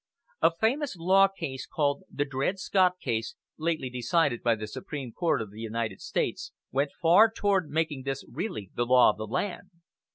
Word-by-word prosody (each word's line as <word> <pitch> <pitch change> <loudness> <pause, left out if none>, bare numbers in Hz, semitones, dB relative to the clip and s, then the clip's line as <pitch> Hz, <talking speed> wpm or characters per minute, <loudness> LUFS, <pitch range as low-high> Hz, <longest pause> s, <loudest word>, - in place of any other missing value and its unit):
A - - +6
famous 260 +3 +1
law 190 +3 +5
case, 140 -9 -6
called 145 -2 -1
the 145 - -1
Dred 140 +7 -1
Scott 185 -1 +3
case, 115 -6 -2 0.2
lately 160 -4 -1
decided 125 +2 0
by 115 -1 +3
the 110 0 -6
Supreme 135 - -6
Court 165 -4 0
of 105 - -12
the 110 +2 -10
United 115 -3 -3
States, - - -2 0.2
went 140 +3 +1
far 180 +7 +6
toward 200 -7 +1
making 155 -3 -1
this 135 0 -4
really 120 - -5
the 120 - -1
law 125 -2 +6
of - - -12
the 110 - -4
land. 190 - -3
145 Hz, 175 wpm, -28 LUFS, 120-180 Hz, 0.2 s, A